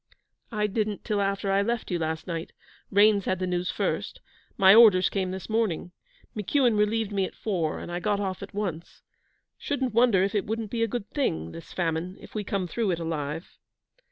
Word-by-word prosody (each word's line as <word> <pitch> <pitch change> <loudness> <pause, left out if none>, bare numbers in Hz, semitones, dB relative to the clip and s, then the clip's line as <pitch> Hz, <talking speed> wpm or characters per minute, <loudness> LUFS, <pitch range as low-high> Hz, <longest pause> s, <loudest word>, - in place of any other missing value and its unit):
'I 210 -2 0
didn't 210 -1 -2
till 210 -3 0
after 195 0 0
I 195 +1 +3
left 230 0 -2
you 175 - 0
last 160 0 -2
night. 165 -2 -5 0.4
Raines 205 0 +4
had 185 - 0
the 185 - -2
news 180 0 -1
first. - - -2 0.4
My 195 -3 +8
orders 210 -5 +7
came 190 -2 -1
this 185 -1 -6
morning. 215 -6 -1 0.4
McEuan 235 +3 +2
relieved 210 0 +1
me 200 -1 +1
at - - -9
four, 175 -8 -1
and - - -7
I 175 - -2
got 205 +2 0
off 190 -2 -3
at 200 - -8
once. 175 -5 -4 0.6
Shouldn't 265 -4 -2
wonder 230 -5 +4
if 195 - 0
it 205 - 0
wouldn't 220 -1 -3
be 235 - -2
a 230 - +3
good 220 -1 -4
thing 80 - -1
this 165 - -10
famine 175 +1 -2
if - - -14
we 215 - -2
come 195 -1 -2
through 220 +3 -1
it 170 -2 0
alive.' 160 0 -4
195 Hz, 200 wpm, -27 LUFS, 180-215 Hz, 0.6 s, My